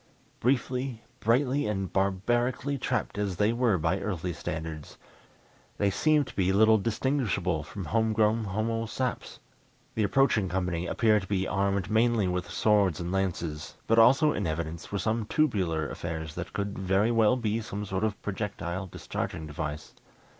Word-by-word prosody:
Briefly, 125 -1 0 0.2
brightly 130 +3 +2
and 95 -3 -2
barbarically 120 +8 0
trapped 105 - -2
as 100 -3 -1
they 105 +5 +2
were 120 -5 +2
by 85 +4 0
earthly 90 -3 -3
standards, 80 -1 -6 0.8
they 100 -1 +2
seemed 150 +7 +3
to - - -12
be 95 -1 +2
little 110 +2 +5
distinguishable 105 - 0
from 90 +6 -7
homegrown 110 +2 +2
homo 115 +3 -1
saps. 125 +2 -3 0.5
The 110 - -1
approaching 110 -3 +3
company 90 -1 -1
appeared 110 -2 +3
to 95 - -9
be 95 -2 0
armed 100 0 0
mainly 110 -2 +3
with 90 0 -2
swords 100 -7 +2
and 85 0 -3
lances, 90 -5 -2
but 115 0 +4
also 135 +6 +6
in 100 - -1
evidence 80 +1 -4
were 100 - -1
some 110 +2 -1
tubular 95 - +1
affairs 80 0 -5
that - - -6
could 100 0 -3
very 95 +4 +2
well 115 +1 +4
be 115 -2 -1
some 105 -1 -5
sort 95 0 -2
of 105 -2 -1
projectile 95 -3 -3
discharging 80 -2 -5
device. 75 0 -5
100 Hz, 155 wpm, -28 LUFS, 90-115 Hz, 0.8 s, also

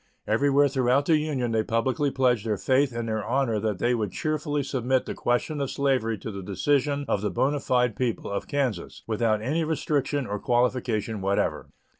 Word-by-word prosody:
Everywhere 140 +6 +3
throughout 135 0 +2
the 160 - +4
Union 140 -6 -1
they 110 -1 +2
publicly 125 +6 0
pledged 125 -5 +1
their 105 -2 0
faith 130 +7 +2
and 115 0 -4
their 110 -1 -2
honor 120 -2 0
that 105 -2 -1
they 120 +5 +1
would 105 -5 -1
cheerfully 150 -1 -1
submit 130 -1 0
the - - -4
question 140 +5 -1
of 135 - -1
slavery 130 -5 0
to 110 - -6
the 100 -1 -6
decision 140 +9 0
of 100 - 0
the 105 - 0
bona 145 +2 0
fide 125 -4 +1
people 120 -5 -2
of 100 - -3
Kansas, 140 -6 -2
without 110 -1 0
any 155 +7 0
restriction 145 -2 -1
or 105 -2 -3
qualification 120 -3 0
whatever. 100 +1 -1
125 Hz, 185 wpm, -26 LUFS, 110-140 Hz, -, the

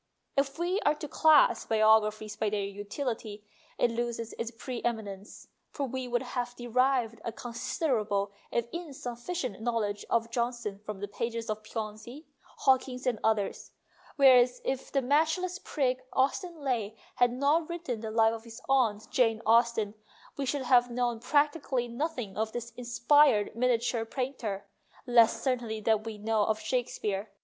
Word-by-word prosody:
If 275 0 0
we 355 +4 0
are 300 -7 +2
to 300 - -6
class 310 0 +4
biographies 215 -1 +3
by 215 - 0
their 205 -1 -1
utility, 210 +1 -5 0.3
it 240 - +2
loses 230 -1 -3
its 230 - -2
pre 240 +1 -6
eminence, 210 -4 -5 0.2
for 280 - -3
we 260 0 -4
would 240 0 0
have 245 -1 -4
derived 240 -2 +1
a 230 - -3
considerable 220 -4 -1 0.2
if 235 -1 0
insufficient 260 - -5
know 235 0 0
ledge 205 -2 -2
of 230 0 +1
Johnson 235 -4 -2
from 210 -1 -7
the 205 - -3
pages 230 +2 -3
of 215 0 -4
Piozzi, 220 +6 -7 0.2
Hawkins, 260 -1 0
and 240 -4 0
others; 215 -3 0 0.4
whereas 255 -3 +6
if 265 -1 -2
that 275 -1 +1
match 310 +5 +3
less 365 0 -4
prig 255 -3 -1
Austen 310 +4 0
Leigh 225 -5 -1 0.2
had 245 -1 +4
not 290 +6 +1
written 340 -9 -4
the 220 0 -5
Life 225 0 +3
of 225 -1 -7
his 230 -1 -11
aunt 230 -6 +2
Jane 225 -4 +3
Austen, 230 -2 +3 0.4
we 275 -1 -3
should 275 +1 -1
have 245 -1 +4
known 240 -1 -1
practically 285 -1 +1
nothing 245 - -4
of 220 0 -1
the 235 0 -5
inspired 240 -1 +3
miniature 235 -1 +1
painter, 225 -6 -4 0.4
less 235 -3 +5
certainly 240 -4 -1
than 215 0 +2
we 220 -1 -6
know 215 0 +1
of 215 0 0
Shakespeare. 215 -3 -2
235 Hz, 155 wpm, -29 LUFS, 220-265 Hz, 0.4 s, whereas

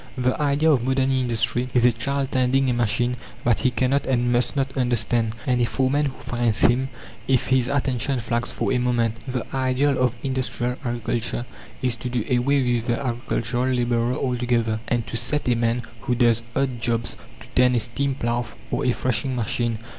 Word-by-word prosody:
The 130 +3 0
idea 150 +2 +3
of 130 -5 +2
modern 130 +1 +1
industry 125 -1 0
is 120 -1 +5
a 125 - +6
child 135 +4 -2
tending 130 +1 +2
a - - +1
machine 120 +1 0 0.3
that 120 -2 +2
he 130 - +2
cannot 130 +3 0
and 120 -2 +1
must 120 +2 +1
not 135 -1 -1
understand, 120 -3 +1
and 125 -3 +2
a - - +4
foreman 135 +4 +1
who 130 - -8
fines 120 -3 0
him 130 +3 +3 0.4
if 130 -2 +2
his 130 -2 +3
attention 135 -1 0
flags 120 +1 -1
for - - -1
a 125 - +2
moment. 120 -2 +1 0.2
The 125 -2 -2
ideal 130 +1 +1
of 125 -1 +2
industrial 130 -2 -1
agriculture 120 0 -2 0.4
is 125 -2 +1
to 125 - -4
do 120 -3 -1
away 135 +3 +2
with 120 -2 0
the 120 - +1
agricultural 120 -1 -1
labourer 120 0 +1
altogether 120 -3 0
and 120 -2 0
to - - -6
set 125 +5 -1
a 125 - +4
man 115 +1 0 0.2
who 125 -2 0
does 120 -2 +3
odd 130 -3 -1
jobs 115 0 -1 0.3
to - - -12
tend 125 -1 +4
a - - +3
steam 135 +5 -1
plough 120 -1 -1 0.2
or 125 +4 0
a 125 - +2
threshing 130 +1 0
machine. 120 0 -1
125 Hz, 190 wpm, -23 LUFS, 120-130 Hz, 0.4 s, a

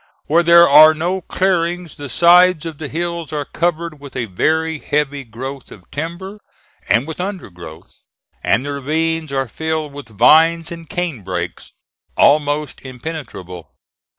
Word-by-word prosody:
Where 165 +3 +3
there 170 0 +7
are 155 +2 +8
no 180 +4 -2
clearings 175 -2 -1
the 145 -1 -8
sides 175 0 +5
of 160 -3 -7
the 155 - -5
hills 170 0 -4
are 150 -2 -3
covered 170 -1 -2
with 140 -1 -12
a 125 -2 -2
very 160 - -1
heavy 145 -1 -2
growth 130 +3 -8
of 90 -4 -15
timber 175 +7 -6 0.5
and 115 +6 +3
with 160 +2 -6
undergrowth, 90 - -9 0.4
and 125 - +1
the 145 - -3
ravines 160 +2 -2
are 135 -1 -1
filled 160 +3 -4
with 140 -4 -10
vines 165 - +4
and 165 -2 -9
canebrakes, 95 - -4 0.4
almost 145 0 +2
impenetrable. 125 - -8
155 Hz, 140 wpm, -18 LUFS, 135-170 Hz, 0.5 s, are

